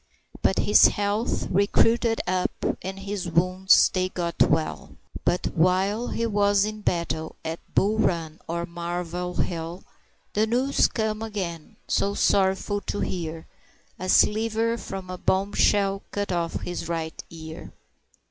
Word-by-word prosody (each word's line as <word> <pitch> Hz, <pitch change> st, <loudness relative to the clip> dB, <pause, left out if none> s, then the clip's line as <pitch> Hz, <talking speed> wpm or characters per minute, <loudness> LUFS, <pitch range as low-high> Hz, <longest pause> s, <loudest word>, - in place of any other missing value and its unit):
But 190 Hz, -, +2 dB
his 210 Hz, -, +6 dB
health 205 Hz, +3 st, -1 dB
recruited 225 Hz, +4 st, +3 dB
up, 185 Hz, 0 st, +1 dB, 0.3 s
and 190 Hz, +1 st, -5 dB
his 195 Hz, -2 st, -4 dB
wounds 185 Hz, +3 st, +4 dB
they 185 Hz, 0 st, 0 dB
got 170 Hz, -2 st, -3 dB
well; 160 Hz, +1 st, +1 dB, 0.3 s
But 180 Hz, -, +1 dB
while 190 Hz, +7 st, +2 dB
he 230 Hz, -, -1 dB
was 205 Hz, -2 st, +3 dB
in 215 Hz, 0 st, -5 dB
battle 165 Hz, -4 st, -2 dB
at 160 Hz, +1 st, -3 dB, 0.2 s
Bull 215 Hz, +3 st, +2 dB
Run 165 Hz, -6 st, 0 dB
or 170 Hz, +1 st, -2 dB
Malvern 175 Hz, +1 st, -3 dB
Hill, 170 Hz, +1 st, -6 dB, 0.5 s
The 215 Hz, +1 st, +2 dB
news 255 Hz, +5 st, +2 dB
come 220 Hz, -1 st, -2 dB
again, 185 Hz, -8 st, -5 dB
so 200 Hz, 0 st, +1 dB
sorrowful 195 Hz, +1 st, +2 dB
to 205 Hz, -, -4 dB
hear 165 Hz, -3 st, -4 dB, 0.5 s
"A 185 Hz, +1 st, -4 dB
sliver 225 Hz, +3 st, +3 dB
from 195 Hz, -4 st, -7 dB
a 180 Hz, -, -6 dB
bombshell 195 Hz, 0 st, +2 dB
cut 205 Hz, -1 st, -3 dB
off 170 Hz, -2 st, -2 dB
his 175 Hz, -2 st, -5 dB
right 160 Hz, -1 st, -4 dB
ear." 160 Hz, 0 st, -9 dB
190 Hz, 135 wpm, -25 LUFS, 170-205 Hz, 0.5 s, his